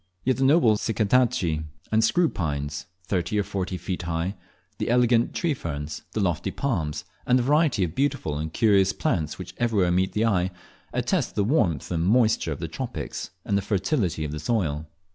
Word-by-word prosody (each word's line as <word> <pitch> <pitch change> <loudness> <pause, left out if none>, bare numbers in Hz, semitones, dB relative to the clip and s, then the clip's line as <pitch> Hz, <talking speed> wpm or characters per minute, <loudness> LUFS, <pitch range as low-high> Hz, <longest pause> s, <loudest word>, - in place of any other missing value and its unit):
Yet 130 0 +1
the 135 - +1
noble 135 -6 +5
Cycadaceae 105 -7 +1 0.3
and 110 +1 +3
screw 175 +9 +3
pines, 75 - -3 0.2
thirty 95 +1 -1
or 105 - +2
forty 95 -2 -3
feet 90 0 -4
high, 85 +2 -2 0.5
the - - -1
elegant 120 -1 +3
tree 170 -4 +1
ferns, 75 - -5
the - - -1
lofty 85 -4 0
palms, 85 - -2 0.2
and 125 - +5
the 125 - +1
variety 145 - +3
of 80 -3 -2
beautiful 105 - -1
and 80 +1 -3
curious 100 -1 +3
plants 80 -4 -1
which - - -8
everywhere 105 -7 +2
meet 95 +2 +1
the 110 +2 +1
eye, 95 -5 +2 0.4
attest - - 0
the 100 - +2
warmth 100 - +1
and 85 -2 0
moisture 110 +1 +3
of - - -4
the - - -3
tropics, - - -5 0.2
and 100 - 0
the 100 - +2
fertility 95 - 0
of 75 - -4
the 75 - -4
soil. 80 -5 -1
100 Hz, 180 wpm, -25 LUFS, 85-120 Hz, 0.5 s, noble